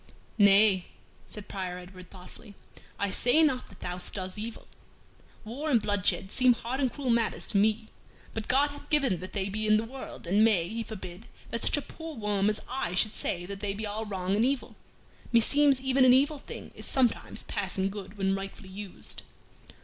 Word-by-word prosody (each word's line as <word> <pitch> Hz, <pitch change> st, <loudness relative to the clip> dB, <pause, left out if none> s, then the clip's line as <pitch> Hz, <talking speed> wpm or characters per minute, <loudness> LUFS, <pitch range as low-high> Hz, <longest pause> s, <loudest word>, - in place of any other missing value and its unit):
"Nay," 200 Hz, -2 st, +6 dB, 0.4 s
said 210 Hz, -2 st, -9 dB
Prior 185 Hz, -2 st, -4 dB
Edward, 180 Hz, 0 st, -12 dB
thoughtfully, 195 Hz, +3 st, -13 dB, 0.4 s
"I 200 Hz, -1 st, 0 dB
say 245 Hz, +11 st, +4 dB
not 265 Hz, -5 st, +1 dB
that 200 Hz, -, -17 dB
thou 180 Hz, 0 st, -4 dB
doest 185 Hz, 0 st, -3 dB
evil. 220 Hz, +2 st, -7 dB, 0.8 s
War 275 Hz, +8 st, -4 dB
and 245 Hz, -5 st, +5 dB
bloodshed 205 Hz, -2 st, +1 dB
seem 255 Hz, -1 st, +5 dB
hard 240 Hz, +3 st, -4 dB
and 260 Hz, -3 st, +1 dB
cruel 270 Hz, -4 st, -2 dB
matters 230 Hz, -1 st, 0 dB
to 205 Hz, -, +1 dB
me; 220 Hz, +2 st, +2 dB, 0.4 s
but 220 Hz, -1 st, -4 dB
God 285 Hz, +3 st, +3 dB
hath 290 Hz, 0 st, -12 dB
given 275 Hz, -, +2 dB
that 185 Hz, +2 st, -8 dB
they 195 Hz, -2 st, -1 dB
be 215 Hz, +2 st, -2 dB
in 215 Hz, 0 st, +5 dB
the 220 Hz, -, 0 dB
world, 255 Hz, -2 st, -8 dB
and 200 Hz, +5 st, +3 dB
may 200 Hz, -7 st, +4 dB
He 225 Hz, +4 st, -4 dB
forbid 190 Hz, -2 st, -8 dB, 0.2 s
that 230 Hz, -, -2 dB
such -, -, +2 dB
a 290 Hz, -, -2 dB
poor 325 Hz, -1 st, -9 dB
worm 210 Hz, -3 st, +1 dB
as 210 Hz, -, -1 dB
I 250 Hz, -9 st, -2 dB
should 210 Hz, +4 st, +2 dB
say 175 Hz, 0 st, -2 dB
that 200 Hz, +1 st, -7 dB
they 200 Hz, -1 st, -2 dB
be 215 Hz, +2 st, -4 dB
all 215 Hz, +1 st, -4 dB
wrong 190 Hz, -1 st, -1 dB
and 215 Hz, -, +3 dB
evil. 265 Hz, +1 st, -1 dB, 0.6 s
Meseems 275 Hz, +4 st, +5 dB
even 265 Hz, 0 st, +2 dB
an 255 Hz, -1 st, +7 dB
evil 285 Hz, +2 st, +2 dB
thing -, -, -9 dB
is -, -, -7 dB
sometimes 255 Hz, -3 st, +1 dB
passing 195 Hz, 0 st, -2 dB
good 200 Hz, 0 st, -8 dB
when 195 Hz, -1 st, +1 dB
rightfully 195 Hz, 0 st, -6 dB
used." 195 Hz, 0 st, -8 dB
215 Hz, 195 wpm, -29 LUFS, 195-250 Hz, 0.8 s, an